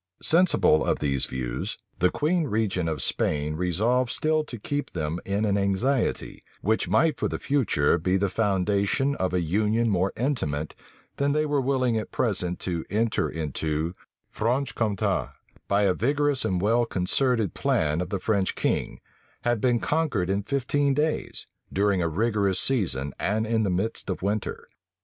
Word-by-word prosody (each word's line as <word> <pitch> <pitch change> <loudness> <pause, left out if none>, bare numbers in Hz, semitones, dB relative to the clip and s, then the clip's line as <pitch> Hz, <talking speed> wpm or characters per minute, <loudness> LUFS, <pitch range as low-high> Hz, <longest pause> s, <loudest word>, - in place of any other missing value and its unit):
Sensible 165 - +4
of - - +1
these 70 -3 0
views, 65 -1 -4 0.2
the 90 - +4
queen 160 - 0
regent 105 - 0
of 80 - -2
Spain 75 0 0
resolved 110 +9 +1
still 155 +3 +1
to 130 -5 -8
keep 145 +7 -4
them 80 0 -2
in 100 +2 0
an 100 -1 +1
anxiety, 110 +7 0 0.2
which 110 -3 +1
might 145 - +2
for - - +1
the - - -3
future 110 - +1
be 90 +4 +1
the 100 +1 +1
foundation 100 +6 +1
of 95 - -1
a 90 0 +1
union 105 +7 +1
more 95 0 +1
intimate 80 - -1 0.4
than 140 0 +1
they 155 +1 +1
were 145 -2 +1
willing 130 -3 +1
at 110 - -6
present 90 -6 -1
to 85 -3 -2
enter 110 +2 0
into 80 +1 -2 0.4
Franche 125 +5 -1
Compte, 105 -4 -1 0.3
by 100 +1 +2
a 95 -2 +3
vigorous 140 +5 +1
and 90 -1 0
well 115 +4 +3
concerted 110 +3 +1
plan 75 +2 0
of 90 - -4
the 100 - -1
French 100 0 0
king, - - -1 0.4
had 120 -3 +1
been 120 -2 +2
conquered 130 - 0
in 100 +1 0
fifteen 140 +3 0
days, 150 +2 -2 0.3
during 100 -1 +1
a 85 - 0
rigorous 100 +1 +1
season, 80 - +1
and 110 +3 0
in 110 0 +1
the 105 - 0
midst 95 +4 -2
of 95 - -3
winter. 105 +1 -2
105 Hz, 165 wpm, -26 LUFS, 90-125 Hz, 0.4 s, Sensible